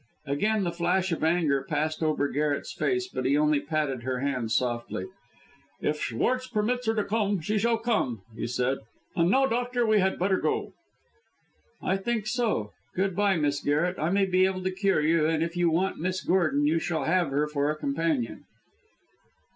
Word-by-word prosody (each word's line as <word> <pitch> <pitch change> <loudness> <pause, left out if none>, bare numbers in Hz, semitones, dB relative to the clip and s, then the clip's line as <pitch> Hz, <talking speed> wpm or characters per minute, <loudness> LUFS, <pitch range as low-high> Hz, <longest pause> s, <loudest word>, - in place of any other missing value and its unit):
Again 200 +10 +1
the 175 - -1
flash 175 +2 0
of 165 - -2
anger 160 -4 +2
passed 155 +3 -2
over 155 -2 +1
Garret's 145 +1 -1
face, 375 -1 0
but 255 - -4
he 135 +3 +2
only 150 -1 +3
patted 145 -4 -2
her 130 +1 -2
hand 125 -5 -1
softly. 120 -6 -1 0.7
"If 150 0 -1
Schwartz 255 - 0
permits 245 +3 -1
her 225 - +2
to 210 - +1
come, 205 -2 0
she 210 +7 -1
shall 230 +2 +2
come," 215 - -1
he 115 - -3
said; 125 +2 0 0.4
"and 170 0 +3
now, 270 +6 +4
doctor, 245 0 0
we 215 -1 +4
had 190 0 +1
better 190 +1 +2
go." - - -1 1.1
"I 190 - +1
think 220 +2 -2
so. 215 - -1 0.2
Good 190 0 0
bye, 200 -2 +2
Miss 145 -2 +1
Garret. 160 +6 0
I 155 - 0
may 195 +2 +3
be 185 0 +3
able 185 -1 -3
to 185 - 0
cure 195 -3 +1
you, 155 0 +3
and 160 0 +1
if 170 +1 -4
you 175 -1 +3
want 180 +4 0
Miss 185 +3 -2
Gordon, 155 -6 +2
you 160 +3 +2
shall 160 -3 -2
have 170 +2 +2
her 145 +2 +1
for 145 -1 0
a 155 - 0
companion." 145 -4 -1
170 Hz, 185 wpm, -27 LUFS, 145-195 Hz, 1.1 s, now